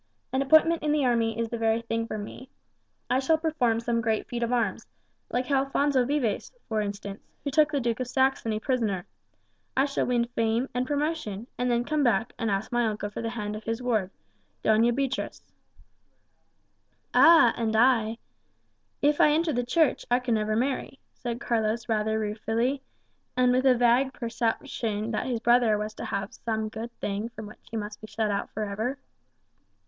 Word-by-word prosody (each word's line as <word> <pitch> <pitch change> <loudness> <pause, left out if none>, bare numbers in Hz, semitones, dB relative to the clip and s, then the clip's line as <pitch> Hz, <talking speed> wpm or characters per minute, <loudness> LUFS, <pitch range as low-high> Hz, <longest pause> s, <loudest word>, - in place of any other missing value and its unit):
An 265 - +2
appointment 315 +4 +5
in 300 - 0
the 295 -2 +2
army 230 -2 +1
is 230 -1 -1
the 235 - -4
very 225 0 +1
thing 230 0 -2
for 215 - -4
me. 215 +5 -8 0.6
I 255 - +2
shall 315 +4 +3
perform 300 -8 +1
some 235 0 0
great 220 -1 -1
feat 240 -1 -4
of 235 0 0
arms, 230 -6 0 0.4
like 250 +3 -2
Alphonso 275 -1 +2
Vives, 260 -8 -1 0.2
for 220 -2 0
instance, 200 -1 -5 0.2
who 280 - -2
took 305 +1 +4
the 285 - +1
Duke 235 -2 -1
of 255 - -2
Saxony 255 -4 +1
prisoner; 220 -8 -1 0.7
I 270 - +5
shall 280 -1 -1
win 240 -1 +2
fame 230 +1 0
and 250 +1 -1
promotion, 290 -8 -2
and 250 0 -1
then 240 0 +2
come 305 +2 0
back 225 -2 +1
and 225 - 0
ask 195 +1 -1
my 240 -1 +2
uncle 210 -1 -3
for - - -5
the 230 - -2
hand 210 -3 -4
of 215 - -8
his 225 +1 -2
ward, 225 -7 0 0.5
Doña 225 +2 +4
Beatriz." 270 -1 -2 1.7
"Ah, 325 -8 +7
and 225 -2 -1
I 225 -1 +3 0.9
if 290 0 +4
I - - +7
enter 315 +1 +2
the 245 0 0
Church, 285 +5 +2
I 245 - +4
can 250 -2 -1
never 215 0 0
marry," 265 +2 -1 0.2
said 240 -1 -5
Carlos 225 -3 -1
rather 220 -1 0
ruefully, 225 +5 -1 0.6
and 250 0 +4
with 255 +2 +3
a 255 -2 +5
vague 245 +3 +3
perception 230 -2 -2
that 225 +3 -2
his 245 -3 -1
brother 235 -2 +4
was 210 +1 -4
to - - -7
have 200 +1 -3
some 220 -1 -3
good 225 +2 -6
thing 205 +3 -2
from 220 -2 -9
which 210 - -12
he 230 - -4
must 210 0 -6
be 215 - -9
shut 215 -1 -1
out 200 - -2
for 215 - -4
ever. 220 +7 -3
235 Hz, 185 wpm, -27 LUFS, 220-260 Hz, 1.7 s, Ah